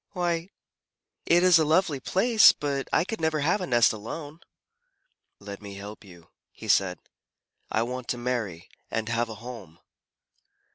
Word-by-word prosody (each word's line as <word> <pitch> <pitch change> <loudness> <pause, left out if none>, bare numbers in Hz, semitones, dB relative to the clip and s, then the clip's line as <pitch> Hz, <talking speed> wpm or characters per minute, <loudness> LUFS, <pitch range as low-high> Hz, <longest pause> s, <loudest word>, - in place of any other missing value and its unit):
"Why, 175 -1 -1 0.8
it 175 +1 +4
is 180 -3 +6
a - - +3
lovely 155 -2 +2
place, 220 - +5
but 140 -2 -3
I - - +3
could 220 0 -6
never 160 -1 0
have 175 +7 +1
a 180 - -3
nest 120 -2 +4
alone." 145 +9 -8 1.0
"Let 100 0 -9
me 100 -1 -9
help 100 +2 -9
you," 85 -4 -16 0.2
he - - -11
said. 90 -2 +3 0.7
"I 110 - +1
want 125 +1 -5
to 125 - -2
marry 115 -8 -3 0.2
and 110 -1 -3
have 115 0 0
a 110 - -7
home." 105 -10 -9
125 Hz, 155 wpm, -26 LUFS, 105-165 Hz, 1.0 s, is